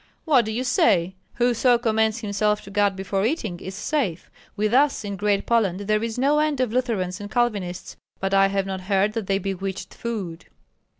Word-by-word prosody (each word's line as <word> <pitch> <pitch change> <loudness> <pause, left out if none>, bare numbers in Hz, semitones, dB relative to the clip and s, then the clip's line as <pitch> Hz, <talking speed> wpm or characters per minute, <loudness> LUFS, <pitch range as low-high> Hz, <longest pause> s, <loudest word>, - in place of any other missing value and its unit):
"What 270 -8 +4
do 220 - -3
you 235 +4 -2
say? 190 -7 +2 0.2
Whoso 245 0 +3
commends 220 -1 +1
himself 210 0 0
to 200 - -11
God 205 -1 +2
before 195 +1 -2
eating 220 - -1
is 190 +1 -7
safe; 205 - -2 0.2
with 210 +1 0
us 275 -4 +3
in 200 -1 -4
Great 205 0 0
Poland 205 -5 +1
there 215 +1 +1
is 230 0 -3
no 285 +4 +3
end 305 -3 +1
of 250 -4 0
Lutherans 210 -7 -1
and 205 - -7
Calvinists, 210 -7 -2 0.2
but 195 0 -2
I 195 0 +5
have 195 0 -1
not 190 -1 -4
heard 195 +2 +1
that 220 -4 -3
they 195 - +2
bewitched 195 0 -4
food." 195 -8 -5
210 Hz, 190 wpm, -24 LUFS, 195-235 Hz, 0.2 s, I